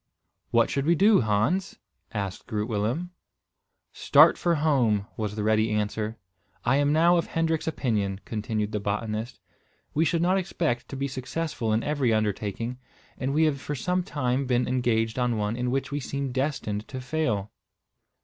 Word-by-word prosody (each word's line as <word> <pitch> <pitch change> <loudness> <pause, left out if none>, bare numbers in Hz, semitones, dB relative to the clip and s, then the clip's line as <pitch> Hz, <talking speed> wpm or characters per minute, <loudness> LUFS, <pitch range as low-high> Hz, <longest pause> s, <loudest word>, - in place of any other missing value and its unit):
"What 115 -1 +3
should 140 +2 -1
we 170 - +5
do, 200 +4 +5
Hans?" 120 - 0 0.3
asked 100 -4 -4
Groot 105 0 -2
Willem. 120 +11 -1 0.8
"Start - - +6
for 170 -1 +1
home," 130 -10 +2
was 105 -2 -3
the 105 - -2
ready 110 +1 +2
answer. 105 +1 -2 0.5
"I 135 +3 +3
am 145 0 +2
now 170 +3 +5
of 170 - 0
Hendrik's 165 -1 -1
opinion," 105 -10 -1
continued 110 -1 -2
the 105 - -1
botanist. 105 +3 -3 0.5
"We 155 - +2
should 165 0 +1
not 185 +2 +3
expect 155 -10 -2
to - - -6
be 135 +1 -2
successful 130 -2 -3
in 110 +1 +1
every 145 -5 +1
undertaking, 110 +3 -1 0.4
and 135 +1 -2
we 155 +3 +3
have 145 -4 +1
for 145 - -4
some 180 +7 0
time 140 -6 -1
been 125 -1 +1
engaged 120 -2 0
on 120 -2 +1
one 105 +1 -1
in 125 +1 -1
which 135 +2 -1
we 145 - -1
seem 140 0 -3
destined 125 -6 -2
to 130 - -6
fail." 125 -8 -1
125 Hz, 170 wpm, -26 LUFS, 110-150 Hz, 0.8 s, Start